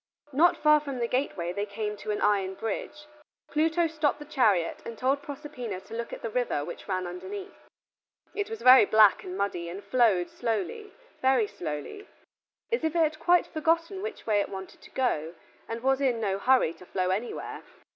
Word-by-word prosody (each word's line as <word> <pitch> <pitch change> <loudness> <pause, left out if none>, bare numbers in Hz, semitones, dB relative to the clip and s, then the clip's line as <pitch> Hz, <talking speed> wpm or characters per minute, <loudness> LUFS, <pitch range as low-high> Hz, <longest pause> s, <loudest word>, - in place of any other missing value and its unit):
Not 330 +6 +4
far 300 0 +5
from 280 -3 -6
the 240 - 0
gateway 195 -10 -1
they 205 +2 -2
came 210 +1 -3
to 215 - -8
an 210 - -1
iron 195 -2 +2
bridge. 225 +8 -5 0.5
Pluto 320 +3 +2
stopped 310 -2 0
the 295 - -10
chariot 215 - +2
and 230 -1 -7
told 270 +4 +1
Proserpina 270 - -6
to - - -13
look 235 +1 -4
at - - -8
the 230 - -3
river 240 -12 -1
which 170 - -8
ran 185 -2 -1
underneath. 380 - -8 0.6
It 410 0 -3
was 450 0 -6
very 255 -2 +9
black 215 -1 +5
and 185 +1 -6
muddy, 180 -4 -2
and 190 +4 -7
flowed 220 -8 +2
slowly, 400 - -3 0.3
very 260 -4 +4
slowly, 170 - -6 0.6
as 470 - 0
if 320 +1 0
it 335 - +4
had 310 0 -1
quite 355 0 +4
forgotten 330 +4 0
which 430 0 -6
way 210 -2 +3
it - - -3
wanted 190 -1 -8
to - - -14
go, 170 -11 -1 0.3
and 230 +1 -5
was 270 +1 +2
in 250 -4 +2
no 195 -3 -1
hurry 250 -7 +3
to 170 +2 -15
flow 185 -1 0
anywhere. 215 +6 -4
240 Hz, 190 wpm, -28 LUFS, 200-300 Hz, 0.6 s, very